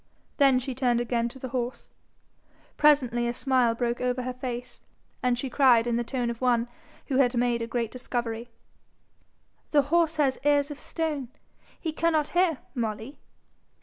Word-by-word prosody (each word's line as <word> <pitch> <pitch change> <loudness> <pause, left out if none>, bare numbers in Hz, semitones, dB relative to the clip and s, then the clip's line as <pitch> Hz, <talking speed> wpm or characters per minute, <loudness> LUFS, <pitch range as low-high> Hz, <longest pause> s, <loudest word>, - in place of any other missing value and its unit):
Then 275 -3 +5
she 255 +1 -3
turned 245 -2 +1
again 235 -1 0
to 265 - -11
the 260 -1 -6
horse. 245 0 -4 0.8
Presently 250 -6 +3
a 240 - -2
smile 250 -4 +2
broke 240 0 -1
over 250 0 -1
her 255 0 -3
face, 250 -1 -6 0.4
and 250 -1 +1
she 270 - -3
cried 250 -3 +4
in 240 -1 0
the 240 - 0
tone 240 0 -2
of 235 - -9
one 240 -2 +2 0.4
who 265 - -1
had 250 -2 +3
made 240 -1 +1
a 230 - -3
great 235 -2 -2
discovery, 240 -2 -4 1.2
'Horse 315 +2 +3
has 275 -3 +2
ears 290 0 +3
of 290 - -8
stone: 305 -5 -3 0.5
he 325 - -3
cannot 315 -2 +1
hear, 350 -4 +2 0.2
Molly.' 230 +2 -4
250 Hz, 160 wpm, -27 LUFS, 240-280 Hz, 1.2 s, Then